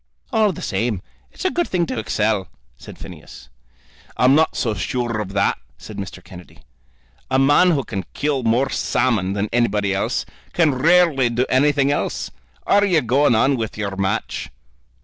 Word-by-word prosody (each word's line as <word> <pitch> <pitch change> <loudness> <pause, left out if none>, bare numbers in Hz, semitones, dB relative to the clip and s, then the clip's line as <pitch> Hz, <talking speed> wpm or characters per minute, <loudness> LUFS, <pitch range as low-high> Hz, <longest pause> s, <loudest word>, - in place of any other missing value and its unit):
"All 215 -2 +3
the 170 - -8
same, 110 0 -1 0.3
it's - - -9
a 370 - +2
good 345 - 0
thing 175 -2 0
to 120 - -4
excel," 105 -2 0 0.3
said - - -12
Phineas. - - -12 0.7
"I'm 125 +2 +5
not 160 +2 +3
so 115 -4 0
sure 115 +1 -2
of 100 -2 -7
that," 100 0 +1 0.2
said - - -10
Mr. 95 -2 -7
Kennedy. 90 -3 -14 0.7
"A 130 - +2
man 145 +7 +5
who 145 -6 +1
can 95 -5 -5
kill 145 -2 0
more 125 +3 +1
salmon 110 -7 0
than 100 +1 -1
anybody 105 -4 +1
else, 95 - -1 0.3
can 160 -5 +3
rarely 150 -2 +3
do 120 +2 0
anything 140 +1 +3
else. 145 - -2 0.3
Are 205 0 +4
you 180 -6 +3
going 125 +1 +3
on 135 +5 +3
with 110 -2 -4
your 100 -2 -3
match?" 95 0 -2
125 Hz, 170 wpm, -20 LUFS, 105-145 Hz, 0.7 s, I'm